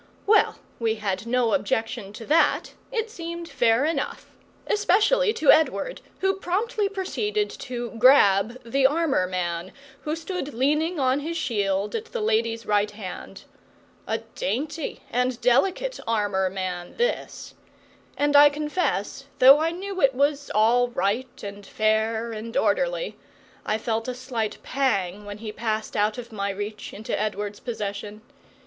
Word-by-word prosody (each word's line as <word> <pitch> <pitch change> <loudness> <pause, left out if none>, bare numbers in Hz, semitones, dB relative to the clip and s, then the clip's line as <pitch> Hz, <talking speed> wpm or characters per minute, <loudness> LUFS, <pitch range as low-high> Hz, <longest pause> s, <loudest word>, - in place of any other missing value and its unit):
Well, 430 +1 +4 0.2
we 225 -1 +1
had 210 0 -3
no 240 -1 +2
objection 225 -6 -1
to 225 +1 -9
that; 315 +6 +2 0.2
it 450 -2 -2
seemed 340 -3 -6
fair 235 -3 +2
enough, 320 +1 -3 0.3
especially 430 +4 +3
to 305 -9 +5
Edward, - - +2 0.2
who 385 0 +3
promptly 405 +3 -1
proceeded 415 +2 -2
to 240 -2 -5
"grab" 235 -2 +5
the 265 +3 +3
armour 290 - +1
man 175 -1 -3 0.3
who 305 +1 -2
stood 330 -4 -5
leaning 300 +6 +1
on 260 +1 +2
his 330 +3 -4
shield 200 -7 -1
at 450 - -3
the 480 - -5
lady's 230 - 0
right 210 0 +2
hand. 205 -3 -8 0.6
A - - 0 0.2
dainty 310 - -3
and 250 0 0
delicate 350 - +2
armour 205 -4 +1
man 185 -2 -5
this! 485 +1 -2 0.6
And 290 0 +2
I 290 +1 +9
confess, 300 +4 -2
though 270 +3 +8
I 320 +1 +1
knew 380 +3 -5
it 270 -2 +4
was 285 +1 +1
all 235 +3 +4
right 240 +3 -2
and 200 0 -7
fair 220 +2 0
and 230 +3 -5
orderly, - - 0 0.5
I 215 - +1
felt 225 +1 -2
a 250 - -3
slight 245 -4 -3
pang 205 -7 -1
when 205 0 -7
he 215 0 -6
passed 215 0 -3
out 210 +2 +1
of 240 -1 -8
my 200 -2 -2
reach 205 +2 -5
into 215 +2 -4
Edward's 210 -1 -3
possession. 210 -2 -5
245 Hz, 145 wpm, -25 LUFS, 210-320 Hz, 0.6 s, I